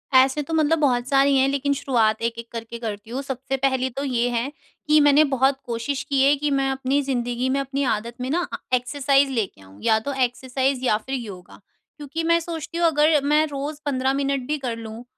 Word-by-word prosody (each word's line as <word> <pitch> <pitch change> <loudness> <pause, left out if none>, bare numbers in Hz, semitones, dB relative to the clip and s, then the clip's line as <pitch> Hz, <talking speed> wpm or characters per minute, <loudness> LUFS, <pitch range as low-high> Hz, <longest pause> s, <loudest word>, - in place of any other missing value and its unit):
ऐसे 265 +3 +5
तो 310 +3 -6
मतलब 320 0 +2
बहुत 250 -4 +1
सारी 275 0 +4
हैं। 265 - +4
लेकिन 280 +1 0
शुरुआत 230 -6 +1
एक-एक 230 0 -4
करके 230 0 -6
करती 215 -1 -6
हूँ। 260 +3 -3
सबसे 270 0 -3
पहली 260 -1 +1
तो 275 +3 -5
ये 245 -3 0
हैं 240 +4 -2 0.4
कि 305 0 +5
मैंने 290 +1 +6
बहुत 265 +1 +2
कोशिश 235 +4 -3
की 275 -1 +2
है 280 +2 +5
कि 290 0 -2
मैं 270 -1 +1
अपनी 270 +2 0
ज़िन्दगी 245 -1 -1
में 275 +1 +1
अपनी 275 +1 -2
आदत 230 +3 -7
में 255 - -3
ना 330 - +1
अ, - - -2 0.2
एक्सरसाइज़ 275 +2 +2
लेके 210 - -3
आऊँ 95 +1 -16
या 220 0 +3
तो 280 +6 -4
एक्सरसाइज़ 260 +1 -1
या 215 - +3
फिर 265 +5 -5
योगा। 200 -7 -8 0.4
क्योंकि 300 +2 -5
मैं 335 +1 +3
सोचती 335 0 -6
हूँ, 340 - +2
अगर 300 -1 +3
मैं 300 +2 +3
रोज़ 285 +1 -5
15 265 -2 0
मिनट 275 -2 -1
भी 300 +1 -1
कर 245 -4 -4
लूँ। 225 +1 -8
270 Hz, 215 wpm, -23 LUFS, 240-285 Hz, 0.4 s, मैंने